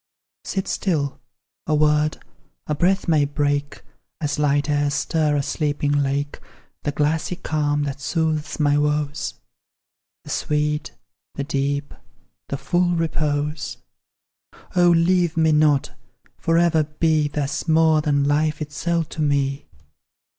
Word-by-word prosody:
Sit 190 -1 -3
still 145 -8 -1 0.5
a 155 - +2
word 150 0 +2 0.5
a 150 - -1
breath 185 +6 +1
may 155 -3 +4
break 145 0 -1 0.4
(As 145 -2 -2
light 145 -1 +2
airs 145 -1 +1
stir 155 -3 +1
a 140 - +1
sleeping 145 -1 -1
lake) 145 0 0 0.4
The 145 - -1
glassy 150 +4 0
calm 145 -3 -1
that 140 -1 -4
soothes 160 -1 -1
my 145 -1 +3
woes 150 -1 -1 0.9
The - - -8
sweet, 150 0 -1 0.4
the 140 - -2
deep, 140 0 -2 0.6
the 140 - -2
full 175 +3 +1
repose. 150 -2 -1 1.0
O 175 -1 +5
leave 175 0 +3
me 160 -1 +4
not! 150 -2 +3 0.4
for 165 0 +1
ever 165 -2 +3
be 155 0 +1
Thus, 145 +2 -3
more 160 -1 +4
than 145 -2 +1
life 150 +1 +1
itself 160 +2 -2
to 155 - -5
me! 140 -1 0
150 Hz, 125 wpm, -22 LUFS, 145-160 Hz, 1.0 s, O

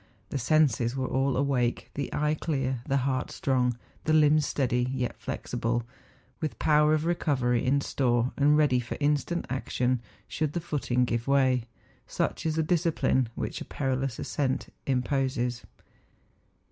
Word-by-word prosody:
The 140 - -2
senses 130 -3 +2
were 130 -1 -1
all 135 0 0
awake, 130 -3 0
the 140 -1 -4
eye 150 0 +1
clear, 135 -5 -2
the 135 - +2
heart 130 -2 -1
strong, 125 -3 0 0.3
the 155 - +2
limbs 150 -1 +5
steady, 125 -2 0
yet 130 -2 -2
flexible, 120 0 -2 0.6
with 155 - -3
power 150 0 +4
of 155 +1 -1
recovery 130 -8 +1
in 140 +2 +2
store, 120 -3 +1
and 145 +1 +4
ready 145 -5 +3
for 120 - -5
instant 150 +4 0
action 125 -1 -1 0.3
should 155 -2 -2
the 175 - -1
footing 135 -6 0
give 120 0 -2
way. 130 -3 +3 0.4
Such - - -1
is 155 - 0
the 160 - +1
discipline 160 -7 +1
which - - -4
a - - -5
perilous 135 -2 -2
ascent 135 -3 -2
imposes. 130 -2 0
135 Hz, 145 wpm, -28 LUFS, 125-150 Hz, 0.6 s, limbs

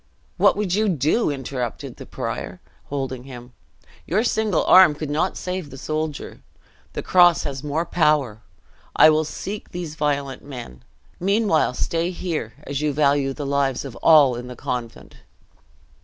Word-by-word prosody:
"What - - +4
would 200 -4 -1
you 215 +2 +2
do?" 160 - +1
interrupted 130 -4 -5
the - - -10
prior, - - -5 0.3
holding 130 -3 -4
him. 125 -2 -11 0.5
"Your 200 +7 +1
single 220 -6 +1
arm 185 -5 +7
could 150 -1 -5
not 165 +5 0
save 180 -4 -4
the 135 - -10
soldier. 155 +1 -4 0.5
The - - -4
cross 175 -2 +5
has 140 -1 -5
more 150 +3 -1
power; 150 -10 +1 0.5
I 155 - +7
will 155 0 +1
seek 200 +6 -6
these 175 -3 -6
violent 145 -3 -2
men. 120 - -9 0.4
Meanwhile 195 - +1
stay 165 +5 -1
here, 170 - -4
as 140 0 -4
you 150 -1 0
value 140 -1 +2
the 145 +2 -6
lives 140 -1 0
of 135 - -8
all 145 -6 +6
in 120 +1 -7
the 125 - -8
convent." 120 -1 -6
150 Hz, 155 wpm, -22 LUFS, 135-170 Hz, 0.5 s, arm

